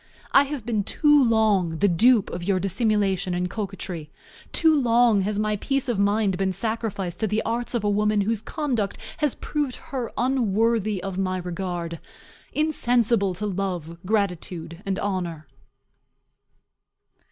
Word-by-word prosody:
I 280 - +6
have 275 -5 -5
been 220 -4 0
too 295 +5 +4
long 210 -8 +2
the 205 - +3
dupe 215 +4 +4
of 175 - -5
your 190 0 +1
dissimulation 195 -2 0
and 180 0 0
coquetry 185 -5 -5 0.4
too 320 -1 +4
long 235 -3 +4
has 205 +2 -1
my 215 0 0
peace 275 +5 -1
of 235 -5 0
mind 200 -2 +2
been 190 -1 +1
sacrificed 220 -5 -3
to 220 - +1
the 215 +2 0
arts 235 +2 -2
of 230 - 0
a - - +1
woman 210 0 +2
whose 215 +1 -1
conduct 250 -11 -2 0.2
has 300 -5 0
proved 290 -4 -2
her 255 -4 -5
unworthy 225 -5 +1
of 195 -1 -4
my 185 -1 0
regard; 175 -2 -4 0.5
insensible 240 -10 +1
to 210 +4 -4
love, 180 -4 -3
gratitude, 180 -4 -2
and 190 -1 0
honor. 175 -6 -3
205 Hz, 145 wpm, -24 LUFS, 185-235 Hz, 0.5 s, I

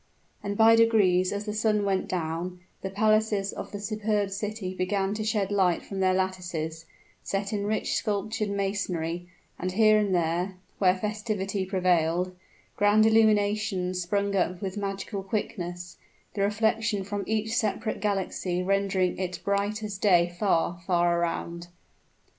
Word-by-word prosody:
And 205 0 -3
by 225 0 +7
degrees 200 -6 +4
as 205 +1 -3
the 210 - -3
sun 215 -1 +1
went 195 -1 0
down, 175 +1 -3 0.2
the 190 - -3
palaces 215 0 +2
of - - -7
the 205 - -5
superb 210 -1 -1
city 205 -1 -4
began 195 +1 -1
to 215 0 -3
shed 210 -2 0
light 185 -4 +2
from 195 - -5
their 185 -1 +3
lattices, 175 -4 -3 0.4
set 200 +1 -3
in 205 -1 -1
rich 215 +1 -1
sculptured 215 +1 -1
masonry; 180 -4 -2 0.3
and 185 0 -2
here 215 +1 +5
and 200 -3 +1
there, 175 +3 0 0.2
where 185 -1 +4
festivity 205 -2 -2
prevailed, 180 -1 +1 0.4
grand 205 +1 +4
illuminations 210 -4 +2
sprung 200 +3 0
up 180 -1 0
with 190 -1 -4
magical 200 0 -4
quickness, 180 -3 -4 0.4
the 200 - -2
reflection 220 0 +1
from 200 +1 -3
each 220 0 -1
separate 220 -1 -1
galaxy 190 -3 -1
rendering 195 -1 +1
it 180 -1 -3
bright 200 +2 0
as 205 -2 -5
day 175 -4 +3
far, 175 -3 +1
far 175 -1 +3
around. 170 0 -3
195 Hz, 145 wpm, -27 LUFS, 180-210 Hz, 0.4 s, by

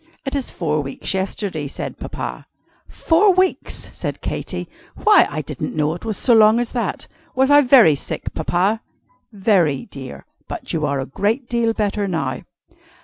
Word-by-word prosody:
"It 270 - -3
is 275 -3 0
four 155 -3 -1
weeks 135 +5 -3
yesterday," 190 -5 -2
said - - -6
Papa. - - -6 0.4
"Four 365 +4 +3
weeks!" 375 0 0
said - - -4
Katy. - - -4 0.3
"Why, 420 -4 +5
I 155 - -4
didn't 145 -1 -5
know 150 0 +1
it 175 - -9
was 215 -3 -2
so 245 - +3
long 220 +1 +6
as 240 -1 -2
that. 245 - -3 0.3
Was 265 +2 +3
I 290 0 +8
very 245 - +6
sick, 140 - -5
Papa?" 195 +6 0 0.5
"Very, 190 - +1
dear. 130 - -10 0.2
But - - -5
you 155 -2 0
are 140 -1 -1
a 135 - -2
great 220 - -1
deal 235 -1 +1
better 205 -1 -1
now." 170 -4 -2
205 Hz, 165 wpm, -20 LUFS, 155-245 Hz, 0.5 s, I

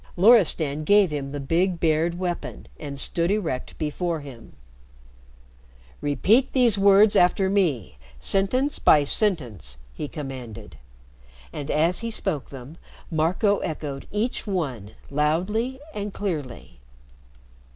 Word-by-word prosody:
Loristan 170 -8 +4
gave 200 0 +4
him 140 -2 -4
the 145 - -5
big 170 +5 0
bared 165 +1 +1
weapon, 180 -1 -5
and 140 -2 -7
stood 170 +4 -1
erect 175 -11 -2
before 160 +1 -2
him. 130 -5 -12 1.5
"Repeat 205 - +2
these 245 -5 +4
words 200 +1 +5
after 190 +1 +3
me 130 - 0 0.2
sentence 255 +9 0
by 150 -2 +5
sentence!" 130 - -1 0.2
he 150 - -5
commanded. 120 - -8 0.8
And 145 0 -6
as 165 +4 +2
he 230 - -3
spoke 190 - -2
them 135 +4 -11 0.3
Marco 180 +6 +1
echoed 145 -4 -5
each 215 +3 -2
one 130 - -3 0.2
loudly 185 - 0
and 205 0 -4
clearly. 150 - -5
165 Hz, 115 wpm, -24 LUFS, 140-200 Hz, 1.5 s, words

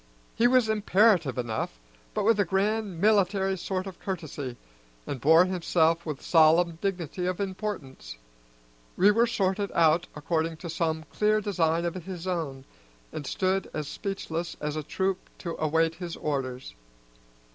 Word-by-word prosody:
He 235 - +3
was 250 -2 +4
imperative 205 - +3
enough, 110 - -3 0.4
but - - 0
with 225 +1 +3
a - - +5
grand 200 0 -1
military 195 -1 +3
sort 185 +1 -3
of 190 -3 -9
courtesy, 150 -9 -5 0.5
and 130 - -5
bore 160 +4 +6
himself 170 -2 +1
with 150 -3 -5
solemn 165 +1 +4
dignity 180 -2 -2
of 185 0 -2
importance. 185 - -5 0.8
We 200 +3 +6
were 230 +3 +3
sorted 200 -2 0
out 165 +1 +3
according 160 +2 -1
to 170 0 -6
some 160 -1 -1
clear 215 0 +2
design 170 -5 0
of 170 - -1
his 185 -1 -7
own, 155 -8 -3 0.5
and 145 -3 -5
stood 190 +4 0
as 155 -2 -3
speechless 175 -4 -4
as 150 0 -3
a 155 - -2
troop 190 +5 -1 0.2
to 170 -2 -5
await 160 +1 +2
his 175 0 -6
orders. 130 -3 -3
175 Hz, 145 wpm, -27 LUFS, 160-195 Hz, 0.8 s, bore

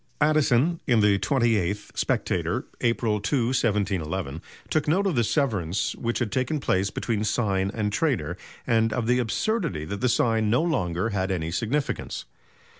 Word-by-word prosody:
Addison, 150 +1 +3
in 120 -5 +4
the 100 -1 +4
twenty 115 +1 +2
eighth 100 +2 -2
Spectator, - - -1 0.2
April 115 -2 +1
2, 115 +3 +1
1711, 95 - -1 0.3
took 155 -1 +1
note 185 +6 +2
of 195 - +1
the 120 -4 +2
severance 105 - 0
which 120 0 -2
had 120 -5 -2
taken 130 +4 0
place 95 -7 +1
between 110 -1 -2
sign 100 -3 0
and 105 -2 -2
trade, - - +1 0.4
and 115 -1 +2
of 120 -1 -1
the 125 +2 +2
absurdity 125 - -1
that 100 +5 -5
the 125 - +2
sign 110 -2 +2
no 120 +8 +3
longer 110 - 0
had 95 -2 -1
any 85 -3 -2
significance. 130 - -2
115 Hz, 160 wpm, -25 LUFS, 100-130 Hz, 0.4 s, in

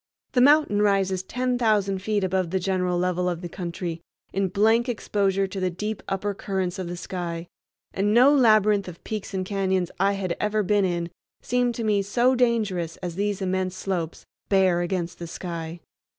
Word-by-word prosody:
The 250 - +3
mountain 285 -6 +5
rises 195 -2 +2
ten 250 +5 -2
thousand 205 -4 +2
feet 205 0 0
above 185 -1 0
the 190 - 0
general 180 -1 0
level 180 0 0
of 175 -1 -3
the 175 - -4
country, 170 -1 -5 0.3
in 195 0 +1
blank 225 +6 +2
exposure 195 -4 0
to 195 0 -5
the 185 -1 +1
deep 210 +4 -4
upper 200 +1 -1
currents 190 -1 -3
of 185 - -3
the 175 0 -5
sky, 175 -2 -4 0.5
and 200 +2 +1
no 250 +6 +6
labyrinth 215 -6 +4
of 170 -2 -10
peaks 215 -2 -5
and 185 -1 -1
cañons 190 -2 0
I 200 +1 +3
had 185 -3 -2
ever 210 0 +1
been 205 +1 +2
in 170 -2 -2 0.3
seemed 245 -1 +1
to 230 - -3
me 210 -2 +2
so 240 +6 +2
dangerous 215 -9 0
as 175 -2 -5
these 200 +1 -1
immense 185 0 -1
slopes, 175 -4 -3 0.2
bare 190 -3 +3
against 175 -1 -3
the 170 - -6
sky. 170 -1 -6
190 Hz, 180 wpm, -25 LUFS, 180-210 Hz, 0.5 s, no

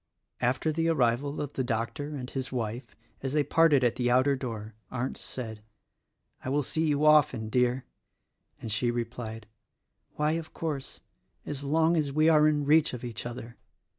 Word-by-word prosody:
After 130 +6 +1
the 165 +1 0
arrival 140 -1 +1
of 145 -1 -4
the 130 - -1
doctor 125 +5 -3
and 125 -3 -5
his 130 0 -5
wife, 120 -1 -4 0.3
as 135 0 -3
they 150 -1 +3
parted 145 -2 +4
at 120 0 +2
the 125 -1 +1
outer 130 +3 +4
door 115 -5 -6 0.2
Arndt 125 +1 -3
said, 110 -4 -6 0.8
"I - - -3
will 145 +2 +1
see 160 +4 0
you 150 0 +2
often, 140 -7 +4
dear;" 125 +2 +1 0.7
and 110 - -5
she 115 +4 +1
replied, 115 -2 -4 0.7
"Why, 150 +1 +1
of 165 0 -4
course, 150 -5 -4 0.4
as 145 -1 -5
long 160 +4 +3
as 150 -4 0
we 155 +3 +4
are 155 -1 +6
in 150 -1 +1
reach 155 -1 +4
of 125 - -9
each 120 -1 -5
other." 120 -1 -8
130 Hz, 170 wpm, -28 LUFS, 120-150 Hz, 0.8 s, are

